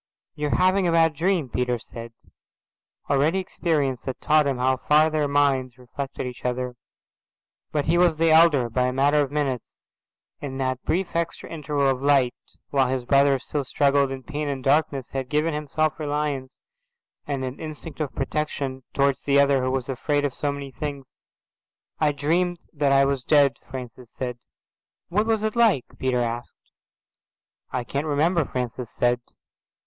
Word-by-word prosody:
"You 150 -1 -2
are - - +1
having 185 0 +3
a - - +2
bad 165 -1 +4
dream," 170 -1 0
Peter 125 0 -1
said. 115 +1 -10 1.0
Already 145 +6 +2
experience 155 -8 -1
had 130 - -4
taught 150 -1 +3
him 135 -2 0
how 130 +1 +2
far 155 +4 +3
their 155 -1 +1
minds 135 -3 +1
reflected 135 +2 -6
each 125 -1 -7
other. 125 0 -2 1.0
But 145 -2 0
he 170 +2 +2
was 175 -3 +4
the 165 0 +3
elder, 160 -6 +5
by 125 +2 0
a - - 0
matter 145 +3 +3
of 140 - -1
minutes, 140 -5 -2 0.6
and 135 -2 -5
that 130 -1 -1
brief 180 +1 -1
extra 170 0 -3
interval 145 -3 -1
of 135 -1 +1
light, 140 -3 +3 0.4
while 135 -2 +3
his 130 -1 -2
brother 140 +1 +4
still 140 +3 -3
struggled 140 +1 +2
in 135 -1 -6
pain 150 0 -4
and 135 -2 -3
darkness, 140 -2 +1
had 135 -1 -4
given 150 +2 +1
him 150 0 -4
self 155 +2 0
reliance 145 -3 -2 0.8
and 135 -2 -2
an 130 +1 -6
instinct 155 0 -8
of 150 -4 -3
protection 135 -2 -2
towards 140 -1 +2
the 140 0 +3
other 140 -1 +4
who 130 - 0
was 130 -2 -2
afraid 145 +3 0
of 140 - -2
so 145 +2 -1
many 140 -1 -7
things. 140 0 -5 0.9
"I 150 -2 +3
dreamed 170 +5 0 0.2
that 145 -3 +1
I 135 0 +5
was 135 -2 -1
dead," 140 -4 +4
Francis 125 -2 -8
said. 125 -2 -5 0.7
"What 210 +5 +1
was 220 -2 +1
it 220 +1 -1
like?"' 225 - +3
Peter 130 -2 +1
asked. 120 +1 -6 1.0
"I 125 -1 -2
can't 140 +5 -3
remember," 155 +3 +2
Francis 125 -2 -4
said. 120 +1 +1
140 Hz, 170 wpm, -24 LUFS, 130-155 Hz, 1.0 s, elder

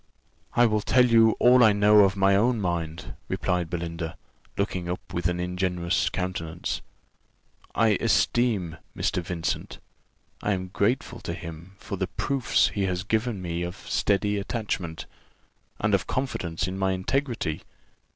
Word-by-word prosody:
"I 120 - +6
will 110 -2 +2
tell 125 +4 +4
you 115 -2 +5
all 125 0 +6
I 110 -2 +6
know 105 +1 +5
of 100 -1 +5
my 95 0 +4
own 115 +3 +2
mind," 85 -3 -3
replied 90 -2 -1
Belinda, 85 0 -4 0.4
looking 90 -3 -2
up 90 - -5
with 85 0 0
an 90 0 -2
ingenuous 90 -1 0
countenance. 85 -2 -3 0.9
"I 115 -1 +4
esteem 105 -10 +1 0.2
Mr. - - 0
Vincent; 85 -1 -3 0.6
I 105 - +1
am 95 -1 -4
grateful 115 +6 0
to 85 - -5
him 85 +2 -9
for 100 - -6
the 95 0 -1
proofs 135 +6 +1
he 100 -2 -1
has 90 0 -1
given 110 -1 -1
me 85 -1 -3
of 90 +1 -4
steady 105 0 0
attachment, 95 -6 -3 0.7
and - - +1
of - - +2
confidence 90 -11 -2
in 95 +1 -4
my 95 0 +1
integrity. 110 - -1
95 Hz, 145 wpm, -26 LUFS, 85-110 Hz, 0.9 s, I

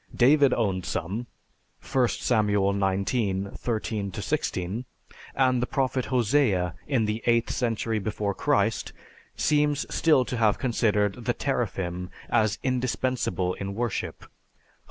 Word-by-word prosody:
David 140 +2 +5
owned 95 -6 0
some 105 +11 -3 0.6
(I 130 -2 +2
Samuel 105 -5 +1
XIX, 100 0 0
13 110 -3 -2
16), 95 +5 -2 0.5
and 130 -2 +3
the 125 - -1
prophet 130 -2 0
Hosea, 115 - +2
in 120 -5 +1
the 105 +2 -2
eighth 115 -1 +3
century 115 -2 -1
before 105 0 -2
Christ, - - 0 0.4
seems 150 -1 +2
still 155 -6 +4
to 125 - -3
have 110 -3 +3
considered 105 -5 0
the - - +1
"teraphim" 90 -1 -2 0.2
as 110 -1 +2
indispensable 125 -7 0
in 100 +1 -5
worship 120 -2 -3
(Hos. - - -16
110 Hz, 120 wpm, -26 LUFS, 100-125 Hz, 0.6 s, David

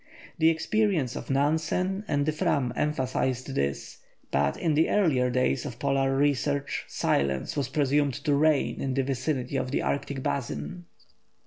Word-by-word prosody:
The 160 0 +6
experience 165 - +1
of - - -7
Nansen 160 +8 0
and 145 -1 +1
the 155 - +2
Fram 140 -4 0
emphasised 130 -2 -1
this, 70 - -2 0.3
but 70 0 +1
in 160 - 0
the 155 +2 +3
earlier 145 -11 +2
days 125 +1 +1
of 130 -5 -6
Polar 135 -1 +1
research 140 0 0
silence 70 -1 0
was 145 -3 -1
presumed 145 -1 +1
to 145 +1 0
reign 150 0 +2
in 135 -1 -1
the 135 - +2
vicinity 130 0 -2
of 130 - -2
the 140 - -1
Arctic 140 -1 -2
basin. 85 - -3
140 Hz, 150 wpm, -27 LUFS, 130-150 Hz, 0.3 s, The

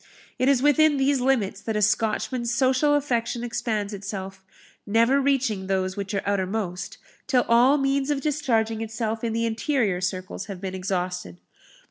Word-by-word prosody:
It 255 - +3
is 270 -2 +3
within 295 0 +4
these 270 -1 +2
limits 250 -7 +1
that 220 - -3
a 210 - +1
Scotchman's 230 +3 0
social 265 +4 +3
affection 240 -4 -1
expands 220 -3 -2
itself, 195 -1 -6 0.4
never 230 +6 +3
reaching 255 -8 0
those 185 -1 -1
which 200 0 -4
are 195 - -1
outermost, 195 -1 -2 0.3
till 260 -4 +2
all 245 +5 +5
means 275 0 0
of 290 -2 +1
discharging 235 -7 0
itself 225 0 -3
in 230 - -1
the 230 +1 0
interior 220 -4 0
circles 185 +2 -4
have 195 -3 -7
been 190 0 -5
exhausted. 180 - -3
225 Hz, 155 wpm, -25 LUFS, 195-265 Hz, 0.4 s, all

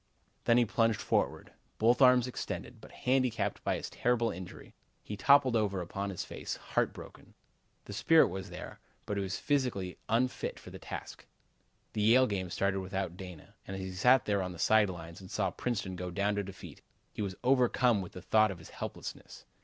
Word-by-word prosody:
Then 115 - +5
he 120 - +5
plunged 115 0 +1
forward, - - -1 0.2
both 120 +4 +3
arms 125 -2 +7
extended, 125 - -6
but - - -13
handicapped 125 -3 0
by - - +1
his - - -4
terrible 120 -2 +1
injury, 90 -1 -9 0.3
he 105 - -5
toppled 140 +1 +5
over 100 -4 +1
upon 100 +3 -4
his 95 - -4
face, - - -5
heart - - -1
broken. - - -13 0.5
The 100 - -8
spirit 160 +9 +5
was 95 +1 -6
there, 90 - -8 0.3
but 105 - -3
he - - 0
was 95 -1 -3
physically 125 -11 -1
unfit 120 +3 0
for - - -12
the - - -9
task. - - -8 0.7
The 105 - -1
Yale 120 +5 +6
game 95 -6 -2
started 95 +2 0
without 95 -2 -3
Dana, 90 -4 -10
and 95 - -5
as 95 - -5
he 95 - -5
sat 125 +7 +4
there 100 -2 +1
on 90 -1 -4
the - - -10
side 110 +2 +4
lines 85 0 -8
and 95 - -11
saw - - 0
Princeton 100 -6 -3
go 90 0 -4
down 100 +4 0
to 100 - 0
defeat, 95 -1 -10 0.3
he - - -5
was 95 -2 -3
overcome 125 -3 +3
with 90 - -8
the 90 - -9
thought 110 0 +4
of 95 - -5
his 80 - -13
helplessness. - - -7
100 Hz, 195 wpm, -31 LUFS, 95-120 Hz, 0.7 s, arms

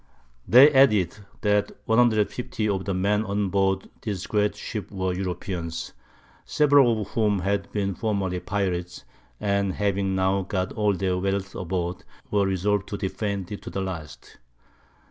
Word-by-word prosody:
They 130 +6 +8
added, 110 -9 +4 0.2
that 105 -1 +1
150 110 -1 +1
of 95 -2 -1
the 100 - -1
Men 105 +3 +1
on 100 -1 -1
board 95 0 +1
this 100 -4 -4
great 105 -1 +1
Ship 105 0 -6
were 95 -2 -2
Europeans, 90 -2 -4 0.5
several 140 -7 +4
of - - -11
whom 105 -4 +1
had 100 +1 -1
been 100 -2 -1
formerly 95 -2 -1
Pirates, 90 -3 -3 0.3
and 100 -1 0
having 100 -1 0
now 95 +1 +2
got 95 -1 -2
all 105 -2 +1
their 95 -1 0
Wealth 95 0 -2
aboard, 90 0 -3 0.3
were 100 -1 +2
resolved 95 +1 0
to 100 - -4
defend 100 -1 -3
it 105 - -6
to - - -8
the 95 - -3
last. 85 -5 -7
100 Hz, 145 wpm, -25 LUFS, 95-105 Hz, 0.5 s, They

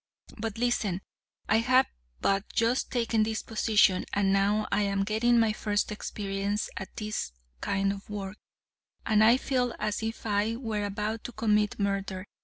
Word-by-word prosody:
But 225 -1 -4
listen, 220 -6 0 0.5
I 220 - +4
have 255 +3 +4 0.4
but 195 +1 +1
just 230 +2 +1
taken 230 -3 +1
this 220 0 -1
position, 215 -4 +3
and 195 -1 +2
now 205 +2 +2
I 200 - +2
am 200 -1 +1
getting 225 +3 +3
my 225 -2 +3
first 210 -1 -1
experience 200 0 -3
at 190 - -7
this 210 - -3 0.3
kind 195 - 0
of 200 +1 -11
work, 200 -1 -5 0.7
and 215 -1 +4
I 235 +3 +6
feel 250 -3 0
as 210 0 -2
if 225 +1 -4
I 210 +1 +1
were 220 -4 -2
about 210 +2 -3
to - - -5
commit 210 -2 +1
murder. 195 -1 -2
210 Hz, 160 wpm, -28 LUFS, 200-225 Hz, 0.7 s, I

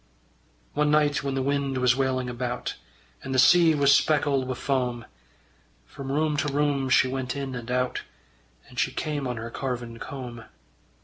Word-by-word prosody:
One 150 0 +2
night 150 -1 +3
when 140 -1 -2
the 135 - 0
wind 140 -1 0
was 125 -1 +3
wailing 130 -1 0
about, 125 0 -3 0.5
And 130 - -4
the - - +2
sea 160 +5 +6
was 140 -1 +5
speckled 140 -4 +2
wi' 130 - -2
foam, 125 -4 -1 0.8
From 135 -1 -7
room 150 +1 +1
to 145 0 0
room 140 -2 +1
she 130 - +5
went 130 -1 -3
in 135 -2 -4
and 120 -1 -6
out 125 0 0 0.7
And - - -7
she - - +1
came 145 -3 -3
on 125 -1 -3
her 115 +1 -6
carven 120 -3 -4
comb. 120 -4 -7
135 Hz, 170 wpm, -26 LUFS, 125-145 Hz, 0.8 s, sea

